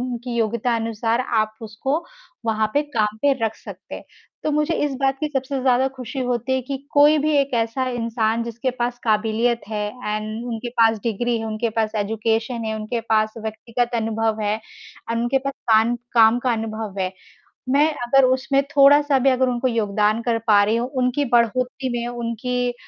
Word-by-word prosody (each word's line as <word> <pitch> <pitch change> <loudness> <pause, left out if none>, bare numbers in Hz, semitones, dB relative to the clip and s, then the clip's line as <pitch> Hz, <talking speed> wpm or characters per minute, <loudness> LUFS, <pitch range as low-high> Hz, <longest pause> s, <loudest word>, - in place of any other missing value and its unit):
उनकी 245 -1 -4
योग्यता 235 +1 0
अनुसार 225 +1 -1
आप 215 -4 0
उसको 265 +9 -2 0.4
वहाँ 220 -1 +1
पे 290 - +3
काम 210 -1 +1
पे 285 - +4
रख 220 0 -1
सकते - - -10
हैं। - - -9 0.4
तो 310 - 0
मुझे 300 +2 +1
इस 290 -2 -2
बात 270 0 +2
की 305 - -1
सबसे 270 -1 -2
ज़्यादा 255 0 +3
ख़ुशी 255 +1 -6
होती 245 +1 -1
है 260 - +1
कि 275 +2 -4 0.2
कोई 295 +1 +6
भी 305 +1 +1
एक 280 -2 +1
ऐसा 230 +3 0
इंसान 230 -1 -1
जिसके 235 +2 -3
पास 245 -1 -3
काबिलियत 225 +2 +1
है 210 -1 -2 0.2
एंड 215 +2 -3
उनके 235 0 -4
पास 225 -2 +3
डिग्री 235 +1 -1
है, 225 - -4
उनके 220 +1 -2
पास 220 0 -1
एजुकेशन 225 +3 -1
है, 220 0 -2
उनके 215 +2 -3
पास 215 -1 +1
व्यक्तिगत 230 +2 -3
अनुभव 225 -1 0
है, 210 0 +1 0.6
एंड 230 0 0
उनके 245 +3 +2
पास 275 +1 -3 0.2
काम 225 +2 +4 0.2
काम 225 0 +5
का 245 0 0
अनुभव 220 -3 -4
है। 185 0 -1 0.6
मैं 285 +3 +4 0.2
अगर 270 +2 +4
उसमें 260 +2 +2
थोड़ा-सा 285 0 +5
भी 270 +1 +3
अगर 255 0 +2
उनको 250 +1 0
योगदान 215 -1 +1
कर 230 -1 0
पा 205 -2 +6
रही 215 +2 +1
हूँ, 240 +2 -1
उनकी 250 +3 +1
बढ़ोतरी 250 +3 +1
में, 235 - -3
उनकी 245 +1 -2
235 Hz, 185 wpm, -22 LUFS, 220-255 Hz, 0.6 s, कोई